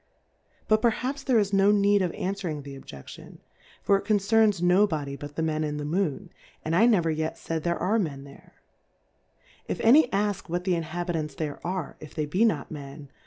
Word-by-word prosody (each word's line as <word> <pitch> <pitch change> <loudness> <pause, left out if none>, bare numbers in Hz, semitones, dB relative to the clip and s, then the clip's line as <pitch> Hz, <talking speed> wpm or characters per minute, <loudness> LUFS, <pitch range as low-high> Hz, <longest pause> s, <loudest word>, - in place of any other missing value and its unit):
But 215 0 +3
perhaps 255 +4 0
there 260 -3 +2
is 205 -2 +1
no 195 +1 +4
need 205 -1 +4
of 180 -2 0
anfwering 185 -6 -4
the 140 0 -9
Olje 70 - -11
ciion^ - - -12 0.5
for 200 - +4
it - - -5
concerns 210 -1 +3
no 180 +4 +4
Body 145 -6 -4
but 145 +1 -9
the 160 - -1
Men 155 -1 -1
in 150 -1 -3
^/;^Moon; 165 +3 -2 0.4
andlneveryet 165 -4 +2
faid 165 -1 -4
there 170 +2 -1
are 210 +6 +1
Men 145 -8 -3
there 140 0 -16 1.1
• - - -2
// - - -4
any 250 +3 +6
ask 205 -2 -1
what 175 +1 -2
the 185 -1 +1
Inhabitants 165 -2 -3
there 150 -2 -4
are^ 180 -3 -4
if 155 - -12
they 155 - -1
be 180 +9 +1
?iot 165 -11 0
Men? 140 -1 -9
175 Hz, 185 wpm, -26 LUFS, 155-205 Hz, 1.1 s, any